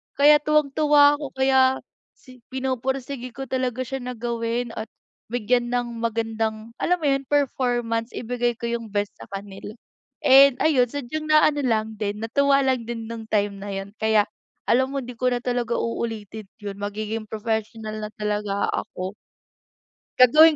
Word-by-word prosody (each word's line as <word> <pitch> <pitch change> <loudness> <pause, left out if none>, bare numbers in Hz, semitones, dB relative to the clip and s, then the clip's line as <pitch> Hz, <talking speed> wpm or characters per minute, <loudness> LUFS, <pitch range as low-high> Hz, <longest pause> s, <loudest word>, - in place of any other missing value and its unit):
Kaya 295 +1 +7
tuwang 300 -1 +2
tuwa 290 -1 +6
ako, 285 -3 -7
kaya 265 0 +3 0.3
si 255 -2 -18
pinupursige 260 0 -3
ko 270 0 -7
talaga 255 -1 -1
siya 270 +1 -4
na 250 - -4
gawin 235 0 -2
at 220 - -3 0.4
bigyan 240 +1 +1
ng 240 -1 -2
magandang, 225 -1 -2
alam 360 +1 +2
mo - - +1
'yon, 275 0 +1
performance, 245 -5 0
ibigay 240 0 -1
ko 235 - -5
'yong 230 -2 -4
best 205 0 -2
sa - - -10
kanila 195 +1 -8 0.5
and 270 -1 +8
ayun 255 -6 +4
sadyang 290 +3 -5
naano 305 -1 +5
lang 220 -3 0
din, 210 -1 -3
natuwa 280 +4 +3
lang 255 -3 +1
din 230 -1 -4
no'ng 225 -1 -7
time 205 -1 +1
na 205 - -6
'yon. 195 +1 -5
Kaya, 220 -1 +4 0.4
alam 260 +2 +3
mo, 275 - -4
'di 250 +1 -8
ko 250 +2 0
na 245 - 0
talaga 245 -2 -1
uulitin 220 -3 -4
'yon, 205 -2 -6
magiging 215 +1 -4
professional 220 0 -3
na 210 - -4
talaga 210 -1 -1
ako. 185 +2 -4 1.1
Gagawin 305 +5 +8
240 Hz, 160 wpm, -24 LUFS, 220-265 Hz, 1.1 s, and